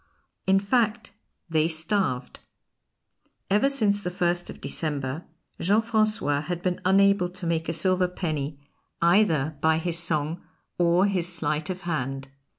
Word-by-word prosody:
In 190 0 +5
fact, 215 +1 0 0.4
they 160 -1 +2
starved. 160 -5 -1 1.1
Ever 210 +7 +4
since 210 -7 +1
the 180 - -3
1st 175 0 -1
of - - -9
December 145 -1 -3 0.3
Jean 200 +5 +3
Francois 215 -10 +1
had 175 +2 -5
been 180 -1 -1
unable 195 -1 +4
to 180 0 -9
make 165 -1 -1
a - - -1
silver 185 +2 +2
penny 155 -5 -4 0.4
either 165 -5 +2
by 160 0 +3
his 170 +1 +2
song 165 0 0 0.4
or 175 +2 +4
his 180 -3 +1
sleight 155 -2 -2
of 185 0 -4
hand. 135 -6 -3
175 Hz, 140 wpm, -25 LUFS, 155-195 Hz, 1.1 s, In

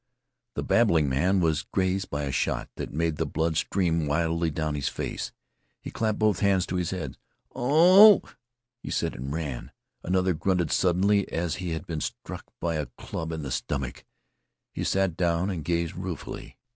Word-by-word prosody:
The - - -2
babbling 85 -11 +3
man 90 +9 +2
was 80 -2 +2
grazed 95 +1 -1
by 75 0 -2
a 70 - -2
shot 65 - -1
that - - -5
made 80 +1 -1
the - - 0
blood 80 0 -1
stream 85 -2 +1
widely 85 +2 +1
down 80 0 -2
his 70 -2 -1
face. - - -4 0.5
He - - -8
clapped 110 -2 -1
both 105 -4 +2
hands 95 -3 +3
to 90 - -3
his 90 -2 -1
head. 90 -4 -5 0.4
"Oh!" 180 - +7 0.6
he - - -7
said, - - -1
and 65 +3 -6
ran. 75 -5 -4 0.3
Another 95 0 +1
grunted 85 -1 0
suddenly 95 +2 +2
as 85 -1 -1
if - - -9
he 90 -1 -3
had 80 -2 -5
been 80 -3 -4
struck - - -6
by 85 -1 -1
a 75 - -2
club 80 0 -5
in 80 -2 -4
the 65 - -5
stomach. 65 0 -3 0.7
He - - -4
sat 95 -3 +1
down 85 +2 +1
and 85 -5 -4
gazed 85 0 -1
ruefully. - - -6
85 Hz, 180 wpm, -27 LUFS, 80-95 Hz, 0.7 s, Oh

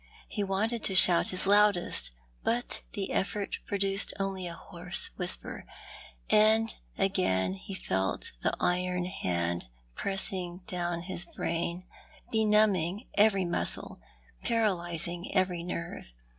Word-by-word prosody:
He 205 - -3
wanted 210 +4 -1
to 190 - +1
shout 180 -2 +10
his 185 - 0
loudest, 205 -2 +3 0.3
but 240 +1 -2
the 200 -3 -3
effort 200 +1 -2
produced 195 -1 +1
only 195 -2 -3
a 170 - -6
hoarse 175 +1 -2
whisper— 180 -1 -3 0.6
and 220 +1 +3 0.2
again 140 - 0
he 145 - -9
felt 95 - -2
the - - +1
iron 180 0 0
hand 85 - -3 0.3
pressing 190 -2 -1
down 175 -4 -3
his 175 -1 0
brain, 170 +1 -4 0.5
benumbing 210 -3 +2
every 205 -3 +3
muscle, 175 - 0 0.4
jDaralysing 175 - -1
every 185 -2 +1
nerve. 175 0 -6
185 Hz, 115 wpm, -29 LUFS, 175-200 Hz, 0.6 s, shout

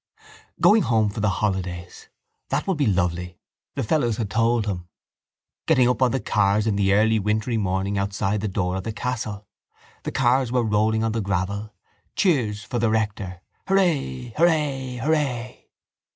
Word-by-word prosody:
Going 220 +1 +6
home 110 - +2
for 105 - -6
the 105 0 +2
holidays! 95 -3 -3 0.4
That - - -1
would 190 -4 0
be 140 - +2
lovely: 90 -2 -1 0.4
the - - -1
fellows 120 -3 +1
had 110 -4 -3
told 115 0 +2
him. 90 -4 -4 0.8
Getting 125 -2 +4
up 125 +1 0
on 130 - +5
the 135 - -1
cars 105 -1 +1
in 110 -3 +1
the 100 -1 +2
early 110 +1 +3
wintry 105 +3 0
morning 100 -1 -1
outside 100 +1 -1
the 110 - -1
door 95 -2 -1
of 95 - -5
the 110 - -4
castle. 110 -4 -4 0.6
The - - -4
cars 130 -1 +2
were 125 -1 +2
rolling 110 +1 +1
on 110 - 0
the 115 0 -1
gravel. 100 +2 -2 0.4
Cheers 120 - +1
for 120 +1 -3
the 115 -1 +2
rector! 105 -4 -2 0.3
Hurray! 150 - 0
Hurray! 150 -6 +1
Hurray! 135 -5 -1
110 Hz, 165 wpm, -23 LUFS, 100-125 Hz, 0.8 s, Going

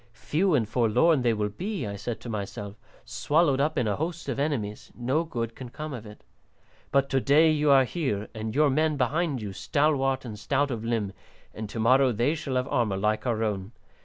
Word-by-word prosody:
Few 150 - +1
and 115 -6 +1
forlorn 125 +7 +3
they 120 -1 +3
will 105 -1 -1
be, 190 - -4
I 100 -1 -4
said 110 +2 -5
to - - -9
myself, 100 -1 -5 0.3
swallowed 140 +6 +2
up 155 +2 0
in 125 - +1
a 105 - 0
host 165 +1 -4
of 135 - -2
enemies; 125 -8 -2
no 130 +7 0
good 115 -8 -4
can 130 -2 -8
come 155 +4 -6
of 115 -4 -7
it. 105 - -13 0.7
But 140 0 +3
to 135 - +3
day 150 +5 +5
you 150 -1 +2
are 135 -1 +7
here, 125 - -2
and 110 -1 -5
your 150 -1 +4
men 155 +1 +1
behind 140 0 0
you, 100 -2 -5
stalwart 135 - +1
and 105 -3 -7
stout 140 +6 0
of 115 -2 -4
limb, 115 -4 -1 0.4
and 110 -1 -6
to 115 - -5
morrow 130 +3 +4
they 120 +6 +1
shall 150 -5 -4
have 125 +1 0
armour 110 -6 +1
like 105 +5 0
our 115 -2 0
own. 100 0 -3
125 Hz, 210 wpm, -27 LUFS, 110-145 Hz, 0.7 s, are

